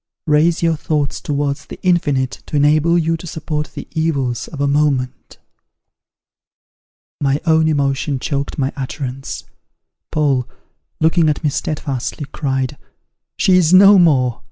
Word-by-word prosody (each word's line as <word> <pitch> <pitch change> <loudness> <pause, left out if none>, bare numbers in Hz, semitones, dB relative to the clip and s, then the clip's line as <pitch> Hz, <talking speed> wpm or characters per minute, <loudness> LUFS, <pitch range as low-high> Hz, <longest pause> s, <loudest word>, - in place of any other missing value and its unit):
raise 160 +2 +2
your 165 -1 +2
thoughts 150 -2 -2
towards 145 -1 -2
the - - -10
infinite, 145 -8 0
to - - -5
enable 155 +4 +3
you 165 0 +1
to 165 +2 -9
support 150 -2 -4
the - - -7
evils 140 -7 -1
of 150 - -9
a 140 - +1
moment.'" 140 -3 -1 1.8
My 140 0 +1
own 160 -1 +3
emotion 140 -1 0
choked 140 +2 -3
my 135 0 -1
utterance. 135 -1 -5 0.7
Paul, 140 -5 0 0.5
looking 160 0 +3
at 150 - -2
me 150 - +1
steadfastly, 145 -1 -3
cried, 135 -3 -2 0.6
"She - - +2
is 175 0 +4
no 195 +1 +8
more! 130 -8 +3
150 Hz, 130 wpm, -18 LUFS, 135-160 Hz, 1.8 s, no